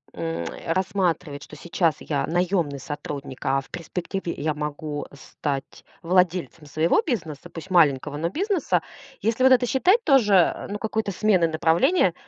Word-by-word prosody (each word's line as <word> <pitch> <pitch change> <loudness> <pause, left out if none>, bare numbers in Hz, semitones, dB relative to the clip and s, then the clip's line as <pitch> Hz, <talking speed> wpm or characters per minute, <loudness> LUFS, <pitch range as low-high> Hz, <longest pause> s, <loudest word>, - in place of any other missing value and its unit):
м, 85 0 -3
э, 160 - -4
рассматривать, 180 -6 -1
что - - -12
сейчас 165 0 0
я 145 -3 -1
наёмный 175 -4 0
сотрудник, 140 -1 -6
а 135 +1 +2
в - - -19
перспективе 175 +1 -4
я 155 +1 -1
могу 150 0 -4
стать 140 0 -5 0.2
владельцем 180 -2 +1
своего 160 - +2
бизнеса, 165 - -4
пусть 165 +3 -9
маленького, 145 -4 +3
но 165 +3 -1
бизнеса. 380 - 0 0.4
Если 230 +3 +1
вот 260 - +6
это 250 -1 +4
считать 370 - +3
тоже, 210 - +4
ну, 205 - -3
какой-то 220 -1 -2
сменой 185 -3 +3
направления, 170 - +3
170 Hz, 145 wpm, -24 LUFS, 150-200 Hz, 0.4 s, вот